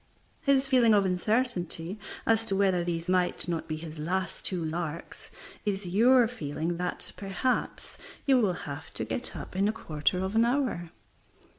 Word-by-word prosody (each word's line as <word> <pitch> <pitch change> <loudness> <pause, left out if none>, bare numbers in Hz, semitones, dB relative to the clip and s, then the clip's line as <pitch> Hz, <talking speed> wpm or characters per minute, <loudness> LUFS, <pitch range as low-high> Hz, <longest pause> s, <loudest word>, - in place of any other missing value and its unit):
His 275 -3 +3
feeling 240 -5 +5
of 200 -1 +4
uncertainty 185 -2 -1 0.3
as 225 0 +3
to 195 - 0
whether 190 -3 +3
these 170 0 -3
might 180 -1 +2
not 165 -2 -2
be 155 - -2
his 155 0 -8
last 180 +4 -2
two 175 -4 0
larks 165 0 -5 0.3
is 200 -2 -2
your 235 +7 +5
feeling 165 -6 -3
that, 180 0 -2
perhaps, 200 +6 -2 0.3
you 270 -2 +5
will 200 -5 +2
have 145 +2 -7
to - - -1
get 245 - -3
up - - -8
in 195 +2 +2
a - - +2
quarter 165 -6 -1
of 190 +2 -2
an 225 - +5
hour. 240 - 0
190 Hz, 165 wpm, -29 LUFS, 170-225 Hz, 0.3 s, feeling